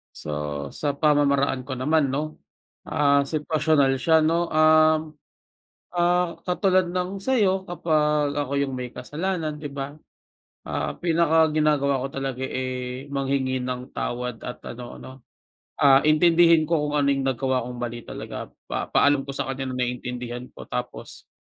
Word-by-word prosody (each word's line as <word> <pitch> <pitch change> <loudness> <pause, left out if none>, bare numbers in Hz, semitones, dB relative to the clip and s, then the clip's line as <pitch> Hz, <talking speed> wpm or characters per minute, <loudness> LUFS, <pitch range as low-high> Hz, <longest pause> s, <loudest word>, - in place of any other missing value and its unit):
So, - - -8 0.4
sa 145 -2 -2
pamamaraan 140 -3 +2
ko 130 -1 -5
naman 145 +2 +2
'no, 150 +3 -4 0.5
ah, 140 -1 +3
sitwasyonal 150 -3 +2
siya 160 -1 +4
'no. 170 +2 +1
Um, 155 0 +4 0.8
ah, 175 0 +2
katulad 185 -1 +2
ng 180 +2 -2
sa'yo 200 -8 +2
kapag 150 -4 +1
ako 140 -1 -2
yung 135 -2 -1
may 125 -1 -5
kasalanan, 160 0 -3
'di 145 - -5
ba, 140 +1 -5 0.7
ah, - - -3
pinaka-ginagawa 155 -4 +2
ko 135 - -2
talaga, 135 -1 -4
eh, 130 0 -4
manghingi 135 -1 0
ng 125 +1 -5
tawad 120 -1 -4
at 125 - -7
ano 120 0 -9
'no, 130 - -10 0.7
ah, 135 -1 +7
intindihin 165 +1 +5
ko 165 - +3
kung 145 - -3
ano 145 -1 +2
yung 135 -1 0
nagawa 130 -1 0
kong 125 0 -7
mali 120 0 -4
talaga. - - -7 0.2
Papa-alam 140 -1 +2
ko 140 - -6
sa 135 - -3
kanya 135 0 -4
na 125 - -1
naintindihan 125 0 -4
ko, - - -10
tapos - - -6
145 Hz, 145 wpm, -24 LUFS, 130-160 Hz, 0.8 s, ah